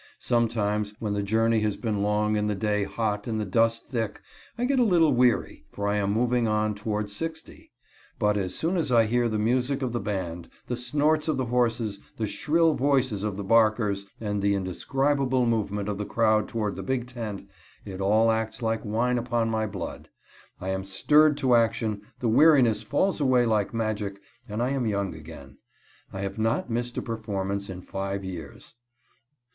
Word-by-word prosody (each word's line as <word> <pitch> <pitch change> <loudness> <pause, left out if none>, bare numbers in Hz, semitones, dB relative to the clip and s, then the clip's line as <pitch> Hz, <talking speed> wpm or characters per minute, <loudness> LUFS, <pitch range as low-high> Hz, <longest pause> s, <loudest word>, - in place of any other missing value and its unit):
Sometimes 105 -3 0
when 105 -3 -3
the 105 - -1
journey 110 +2 +2
has 105 -2 -1
been 110 -4 -2
long 105 +1 +1
and 105 0 0
the 105 - 0
day 105 0 0
hot 105 +1 -2
and 110 -2 -1
the 105 - -1
dust 115 +3 +1
thick, 115 -5 -2 0.4
I 245 - 0
get 270 0 +2
a - - +5
little 170 - +4
weary, 125 -1 +1
for 100 0 -3
I 105 0 +1
am 100 -1 0
moving 120 +2 +1
on 105 0 +1
towards 105 0 -3
sixty. 160 +4 -7 0.5
But 105 0 +2
as 95 -3 -2
soon 175 +4 0
as 155 -6 0
I 115 -2 +5
hear 120 +2 +1
the 110 - -1
music 125 +5 +1
of 125 - -1
the 120 - -1
band, 90 -6 -4 0.2
the 125 - -3
snorts 150 +6 +1
of 155 - +1
the 130 - 0
horses, 115 -4 0 0.2
the 110 - -1
shrill 165 +8 +2
voices 130 -7 +1
of 105 -2 -2
the 100 - -4
"barkers," 110 -2 +2
and 105 -2 -2
the 100 0 +2
indescribable 130 - 0
movement 105 -3 -1
of 105 -1 -3
the 105 - -2
crowd 110 -2 +2
toward 105 -3 -3
the - - -4
big 130 -2 -2
tent, 115 -6 -6 0.4
it 95 -2 -6
all 110 +3 +4
acts 110 +1 -2
like 115 0 -1
wine 120 +4 0
upon 120 -1 0
my 110 -1 0
blood. 105 - -7 0.5
I 95 - -4
am 95 0 -2
stirred 150 +10 +4
to 130 -4 +2
action, 115 -3 +1 0.2
the 120 - -1
weariness 125 -3 +5
falls 155 - 0
away 130 -3 +4
like 110 -3 +1
magic, 105 -3 -2 0.3
and 105 +3 -2
I 125 - 0
am 135 -4 0
young 100 -3 -1
again. 75 -4 -12 0.5
I 95 - -5
have 100 +2 -4
not 115 +2 0
missed 120 +1 -2
a - - -2
performance 100 -3 -3
in 90 -1 -7
five 95 0 -4
years. 85 -6 -8
110 Hz, 190 wpm, -26 LUFS, 100-125 Hz, 0.5 s, a